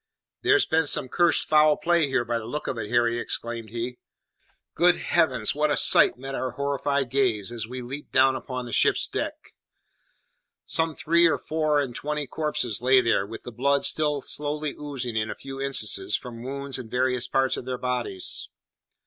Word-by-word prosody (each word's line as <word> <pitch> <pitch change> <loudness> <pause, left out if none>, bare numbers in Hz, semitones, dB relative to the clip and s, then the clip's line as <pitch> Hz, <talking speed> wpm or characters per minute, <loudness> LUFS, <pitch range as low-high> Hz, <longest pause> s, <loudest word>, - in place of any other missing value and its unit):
"There's 405 0 +4
been 160 -1 +1
some 130 - +3
cursed 175 +3 +2
foul 150 -1 +5
play 170 -3 +2
here, 130 -3 0
by 120 0 -1
the 110 - -9
look 150 +5 -4
of - - -3
it, 105 -1 -5
Harry," 120 0 +2
exclaimed 115 -1 -4
he. 120 +2 -5 0.7
Good 175 +1 +4
heavens! 130 -10 +1
what 150 +1 +1
a 145 - +1
sight - - +6
met 135 +2 -7
our 130 -2 -3
horrified 140 -1 -1
gaze 120 -6 +1
as 115 -2 -4
we 125 +1 -6
leaped 135 +4 -8
down 130 0 +4
upon 130 -1 -5
the 120 - -8
ship's - - +2
deck! - - -5 1.1
Some 160 -1 -1
three 170 +1 +4
or 160 - +1
four 155 -2 0
and 130 -4 -3
twenty 150 0 -3
corpses 130 -6 -2
lay 130 +1 +5
there, 115 -5 +1
with 115 +2 -9
the 120 - -8
blood 140 +4 +1
still 150 -2 +1
slowly 150 0 -3
oozing 130 -5 -4
in 110 0 -1
a - - -4
few 135 0 -8
instances 105 -7 0
from 115 -2 -7
wounds 135 +1 -5
in 120 -3 -9
various 125 0 0
parts 135 -1 +1
of - - -7
their 130 -1 -3
bodies. 125 -7 -3
130 Hz, 185 wpm, -25 LUFS, 120-150 Hz, 1.1 s, sight